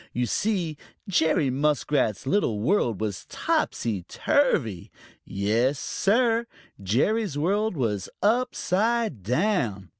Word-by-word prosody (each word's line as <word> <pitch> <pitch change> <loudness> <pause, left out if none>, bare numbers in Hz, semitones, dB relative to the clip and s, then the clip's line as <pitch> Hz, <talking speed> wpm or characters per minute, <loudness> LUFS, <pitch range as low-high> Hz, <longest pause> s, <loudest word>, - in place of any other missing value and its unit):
You 125 +1 0
see, 175 - -1 0.3
Jerry 160 -6 +2
Muskrat's 140 -6 0
little 135 - +1
world 120 - +1
was 105 -4 -4
topsy 105 -5 -1
turvy. 130 - 0 0.4
Yes, 110 +8 0
Sir, 230 - +1 0.3
Jerry's 145 - 0
world 200 +5 0
was 105 -7 -1
upside 225 - +1
down! 120 - 0
150 Hz, 95 wpm, -25 LUFS, -, 0.4 s, Jerry